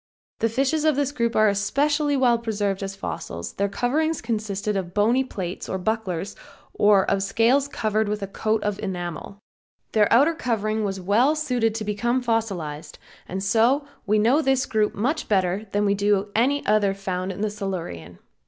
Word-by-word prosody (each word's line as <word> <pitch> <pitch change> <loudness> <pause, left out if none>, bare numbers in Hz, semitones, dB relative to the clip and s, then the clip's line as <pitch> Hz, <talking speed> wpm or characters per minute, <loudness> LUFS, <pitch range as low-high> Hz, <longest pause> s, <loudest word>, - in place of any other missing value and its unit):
The 225 - +1
fishes 275 +6 0
of 310 -2 +3
this 285 0 0
group 235 -4 -1
are 215 0 +5
especially 285 +8 +1
well 245 -3 +3
preserved 205 -4 -2
as 195 0 -4
fossils, 85 - -6
their 200 0 -1
covering 305 +10 0
consisted 215 -4 -3
of 180 -2 -4
bony 230 +6 +3
plates 185 -8 -6
or 190 - -1
bucklers 195 -2 -2 0.4
or 205 -2 +4
of 195 - +1
scales 235 +7 +2
covered 215 -5 -1
with 210 -1 -2
a - - -3
coat 215 +2 -1
of 205 -1 -2
enamel. 180 -1 -5 0.5
Their 210 -2 +3
outer 280 +8 +5
covering 220 -7 -1
was 195 -2 -2
well 225 +11 +3
suited 250 -8 0
to 220 -1 -3
become 235 +5 0
fossilized, 195 -10 -2 0.3
and 190 +1 -3
so 235 +8 +3 0.2
we 210 +1 +3
know 240 +8 +3
this 270 -2 +2
group 215 -1 0
much 285 +9 -1
better 195 +1 +1
than 205 +1 +1
we 200 - +3
do 205 0 +1
any 275 +6 +2
other 205 -2 +2
found 185 -1 -3
in 190 +2 -7
the 215 -1 0
Silurian. 165 - -5
215 Hz, 175 wpm, -24 LUFS, 195-245 Hz, 0.5 s, are